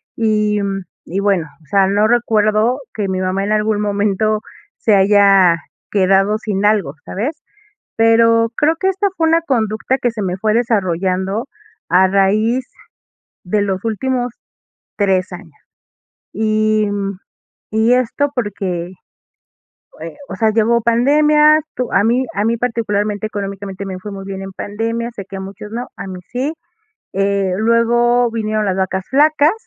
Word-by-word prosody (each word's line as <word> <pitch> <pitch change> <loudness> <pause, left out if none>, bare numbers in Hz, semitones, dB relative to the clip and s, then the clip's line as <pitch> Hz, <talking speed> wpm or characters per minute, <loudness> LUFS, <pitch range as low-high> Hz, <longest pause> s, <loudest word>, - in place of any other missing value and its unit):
y, 210 -2 +1
mm, 195 -1 -2 0.2
y 185 +4 -3
bueno, 195 -5 +1 0.2
o - - -23
sea, 195 -1 +3
no 205 +2 +2
recuerdo 220 +1 +2
que 210 -2 -2
mi 185 0 -2
mamá 185 +1 -1
en 210 +1 0
algún 215 0 +1
momento 210 +1 0 0.4
se 215 - +2
haya 195 -3 +5 0.4
quedado 195 +1 +3
sin 205 -2 -2
algo, 205 -9 +2
¿sabes? 265 +11 -4 0.6
Pero 230 0 +4
creo 310 +2 +2
que 380 - 0
esta 385 +2 0
fue 325 -1 +2
una 330 +1 +3
conducta 235 -3 -1
que 240 - +1
se 220 -2 -6
me 185 0 -2
fue 215 +2 0
desarrollando 195 -2 0 0.4
a 185 +2 +5
raíz 215 +6 +2 0.8
de 200 +3 0
los 195 +1 -2
últimos 245 +2 -1 0.6
3 190 -2 +1
años. 175 -4 -11 0.7
Y 215 0 +1
mm, 200 -1 -3 0.5
y 220 +3 +2
esto 255 +3 0
porque, 190 -6 -3 1.1
eh, - - -8
o - - -6
sea, 220 -1 +2
llegó 230 +2 +2
pandemia, 300 +6 +4
tu 250 -2 -3
a 200 - +3
mí 245 +4 +2
a 205 - 0
mí 230 +1 +1
particularmente 215 -3 -1
económicamente 200 -2 -5
me 185 -1 -5
fue 205 +2 -7
muy 195 -1 -7
bien 195 0 -6
en 195 0 -7
pandemia, 230 +4 -3
sé 200 - -7
que 195 - -7
a - - -5
muchos 195 +2 -9
no, 240 +2 -4
a 200 - -7
mí 185 -1 -7
sí. 265 +5 -1 0.6
Eh, 195 -1 0
luego 235 +1 +3
vinieron 215 -1 -1
las 190 -1 0
vacas 190 0 -1
flacas 300 +3 +4
210 Hz, 155 wpm, -17 LUFS, 195-230 Hz, 1.1 s, haya